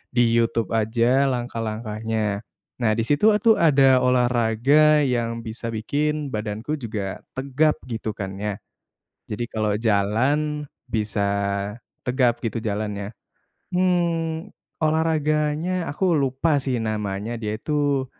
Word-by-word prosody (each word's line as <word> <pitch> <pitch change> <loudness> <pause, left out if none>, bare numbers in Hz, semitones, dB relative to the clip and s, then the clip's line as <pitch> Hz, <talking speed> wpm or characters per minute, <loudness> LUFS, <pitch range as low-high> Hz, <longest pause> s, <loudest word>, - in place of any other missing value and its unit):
di 120 - +5
YouTube 115 -1 +1
aja 115 +5 +2
langkah-langkahnya, 110 -3 -2 0.4
nah 110 -3 +2
di 115 - 0
situ 145 - +3
atuh 225 +1 +4
ada 135 -5 +5
olahraga 125 +5 +3
yang 115 -3 -1
bisa 115 +1 -6
bikin 145 +5 -1
badanku 110 +7 -3
juga 105 -5 -4 0.2
tegap 140 +3 +1
gitu 110 -3 -4
kan 95 -1 -5
ya, 105 -2 -2 0.7
jadi 105 +3 -3
kalo 105 -2 0
jalan 120 +8 +1 0.2
bisa 105 -2 -1 0.8
tegap 125 -2 +2
gitu 115 +1 -3
jalannya. 105 -1 -3 0.6
Hmm, 170 -1 0 0.3
olahraganya 155 +2 +1
aku 175 +4 +1
lupa 140 +1 +1
sih 130 -2 -1
namanya, 105 0 -3
dia 105 0 -2
itu 145 0 0
120 Hz, 110 wpm, -23 LUFS, 110-150 Hz, 0.8 s, di